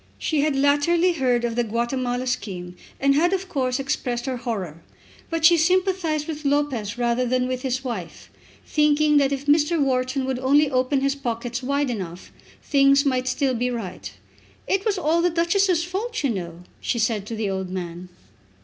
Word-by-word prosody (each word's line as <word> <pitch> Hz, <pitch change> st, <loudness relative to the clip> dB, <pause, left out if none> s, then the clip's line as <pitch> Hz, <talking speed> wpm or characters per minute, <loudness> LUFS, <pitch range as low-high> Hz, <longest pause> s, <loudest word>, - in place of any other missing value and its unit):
She 305 Hz, -3 st, 0 dB
had 300 Hz, -1 st, +1 dB
latterly 290 Hz, +6 st, +3 dB
heard 250 Hz, -5 st, +1 dB
of 230 Hz, -1 st, -2 dB
the 240 Hz, -, +1 dB
Guatemala 245 Hz, +2 st, -2 dB
scheme, 180 Hz, -7 st, -4 dB, 0.2 s
and 275 Hz, 0 st, +3 dB
had 345 Hz, +6 st, +2 dB
of 380 Hz, 0 st, -2 dB
course 260 Hz, -7 st, -1 dB
expressed 260 Hz, -3 st, -2 dB
her 260 Hz, -2 st, -2 dB
horror. 195 Hz, -, -5 dB, 0.5 s
But 330 Hz, -1 st, 0 dB
she 340 Hz, +1 st, +7 dB
sympathised 360 Hz, -3 st, +1 dB
with 310 Hz, -1 st, -5 dB
Lopez 275 Hz, -7 st, 0 dB
rather 240 Hz, +1 st, +1 dB
than 250 Hz, 0 st, 0 dB
with 255 Hz, 0 st, -3 dB
his 260 Hz, -1 st, -2 dB
wife, 220 Hz, -10 st, -6 dB, 0.3 s
thinking 300 Hz, 0 st, +3 dB
that 280 Hz, -1 st, +3 dB
if 275 Hz, 0 st, -3 dB
Mr. 300 Hz, +3 st, +3 dB
Wharton 260 Hz, -1 st, 0 dB
would 260 Hz, -1 st, -2 dB
only 280 Hz, +3 st, +3 dB
open 260 Hz, +1 st, +1 dB
his 275 Hz, 0 st, +1 dB
pockets 240 Hz, -2 st, -4 dB
wide 280 Hz, +1 st, 0 dB
enough 185 Hz, -5 st, -6 dB, 0.3 s
things 275 Hz, 0 st, +4 dB
might 255 Hz, -2 st, 0 dB
still 265 Hz, 0 st, +1 dB
be 245 Hz, +1 st, -1 dB
right. 185 Hz, -, -6 dB, 0.5 s
"It 390 Hz, +2 st, 0 dB
was 410 Hz, -2 st, +1 dB
all 335 Hz, 0 st, +1 dB
the 355 Hz, -, +3 dB
Duchess's 345 Hz, +1 st, +2 dB
fault, 410 Hz, +6 st, -3 dB
you 275 Hz, -, +2 dB
know," 175 Hz, -4 st, -6 dB, 0.2 s
she -, -, -2 dB
said 220 Hz, -3 st, 0 dB
to 230 Hz, -, -4 dB
the 215 Hz, -2 st, -2 dB
old 190 Hz, -1 st, -3 dB
man. 180 Hz, -1 st, -6 dB
265 Hz, 180 wpm, -23 LUFS, 235-300 Hz, 0.5 s, she